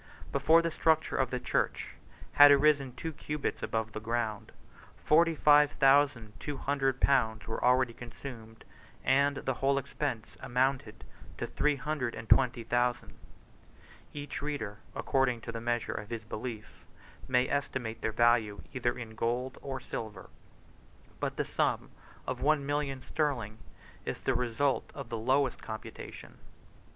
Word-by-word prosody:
Before 160 Hz, +4 st, +4 dB
the 165 Hz, -, 0 dB
structure 160 Hz, 0 st, +2 dB
of 130 Hz, -, +1 dB
the 125 Hz, -, -2 dB
church -, -, -1 dB, 0.4 s
had 145 Hz, 0 st, +9 dB
arisen 140 Hz, -2 st, +4 dB
two 160 Hz, +4 st, -5 dB
cubits 150 Hz, 0 st, -3 dB
above 110 Hz, -1 st, -2 dB
the 110 Hz, -, -5 dB
ground, 110 Hz, -2 st, -2 dB, 0.5 s
forty 165 Hz, +1 st, +3 dB
five 150 Hz, -1 st, +5 dB
thousand 135 Hz, -5 st, +3 dB
two 145 Hz, -2 st, -4 dB
hundred 135 Hz, -1 st, 0 dB
pounds 110 Hz, -6 st, +2 dB
were 115 Hz, -, -4 dB
already 125 Hz, -1 st, +3 dB
consumed; 115 Hz, -2 st, -10 dB, 0.4 s
and 140 Hz, +1 st, +3 dB
the 130 Hz, 0 st, -1 dB
whole 135 Hz, +2 st, +1 dB
expense 140 Hz, -4 st, -3 dB
amounted 125 Hz, -3 st, -1 dB, 0.3 s
to -, -, -2 dB
three 150 Hz, -1 st, +1 dB
hundred 140 Hz, -3 st, -3 dB
and 110 Hz, -, -8 dB
twenty 125 Hz, -2 st, +4 dB
thousand: 120 Hz, +1 st, 0 dB, 1.0 s
each 145 Hz, -4 st, -6 dB
reader, 125 Hz, -9 st, -4 dB, 0.2 s
according 135 Hz, -3 st, +1 dB
to 115 Hz, -, -6 dB
the 115 Hz, 0 st, -5 dB
measure 120 Hz, 0 st, -1 dB
of 105 Hz, -, -6 dB
his 115 Hz, -2 st, -5 dB
belief, 110 Hz, 0 st, -7 dB, 0.4 s
may 125 Hz, 0 st, +3 dB
estimate 125 Hz, -5 st, -2 dB
their 110 Hz, -, 0 dB
value 115 Hz, -2 st, +2 dB
either 120 Hz, -2 st, -1 dB
in 115 Hz, -3 st, -7 dB
gold 120 Hz, +3 st, -2 dB
or 135 Hz, -2 st, -4 dB
silver; 110 Hz, -5 st, -7 dB, 0.9 s
but -, -, -3 dB
the -, -, 0 dB
sum -, -, -1 dB, 0.3 s
of -, -, -4 dB
one 150 Hz, -1 st, +2 dB
million 145 Hz, -2 st, -2 dB
sterling 120 Hz, -8 st, -2 dB, 0.4 s
is -, -, -4 dB
the 135 Hz, -, +1 dB
result 125 Hz, +3 st, 0 dB
of 140 Hz, -5 st, -7 dB
the 115 Hz, -, -3 dB
lowest 130 Hz, +2 st, +1 dB
computation. 110 Hz, 0 st, -9 dB
130 Hz, 145 wpm, -31 LUFS, 115-140 Hz, 1.0 s, had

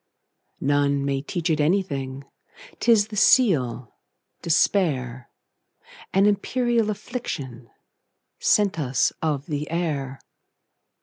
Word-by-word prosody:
None 140 Hz, 0 st, +1 dB
may 135 Hz, -1 st, -1 dB
teach 170 Hz, +3 st, -2 dB
it 155 Hz, -, 0 dB
anything,'T 160 Hz, -, -3 dB
is 215 Hz, -2 st, +4 dB
the 215 Hz, -, -7 dB
seal, 150 Hz, -, +3 dB, 0.5 s
despair,—An 155 Hz, -, -2 dB
imperial 230 Hz, +2 st, +1 dB
afflictionSent 155 Hz, -, -6 dB, 1.1 s
us 130 Hz, -4 st, +1 dB
of 150 Hz, -3 st, -1 dB
the 150 Hz, -1 st, -4 dB
air. 145 Hz, -6 st, -3 dB
150 Hz, 80 wpm, -24 LUFS, 135-205 Hz, 1.1 s, is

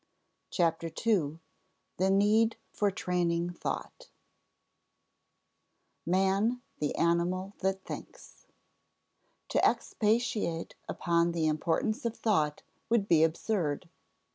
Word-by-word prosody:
CHAPTER 165 Hz, -2 st, +1 dB
TWO 165 Hz, -7 st, 0 dB, 0.6 s
THE 190 Hz, +2 st, +2 dB
NEED 210 Hz, +3 st, +4 dB, 0.2 s
FOR 205 Hz, -, +2 dB
TRAINING 175 Hz, -2 st, 0 dB
THOUGHT 175 Hz, -, -5 dB, 1.9 s
[Sidenote: -, -, -28 dB
Man 195 Hz, +7 st, +2 dB, 0.2 s
the 150 Hz, -, -1 dB
animal 175 Hz, +3 st, +1 dB
that 190 Hz, 0 st, -1 dB
thinks] -, -, -10 dB, 1.0 s
To -, -, +1 dB
expatiate 215 Hz, -6 st, +1 dB, 0.2 s
upon 170 Hz, 0 st, +1 dB
the 165 Hz, -2 st, 0 dB
importance 165 Hz, +7 st, 0 dB
of 235 Hz, -1 st, -2 dB
thought 155 Hz, -9 st, +1 dB, 0.3 s
would 225 Hz, -3 st, +2 dB
be 160 Hz, -4 st, +5 dB
absurd. 165 Hz, -1 st, 0 dB
180 Hz, 95 wpm, -30 LUFS, 165-210 Hz, 1.9 s, be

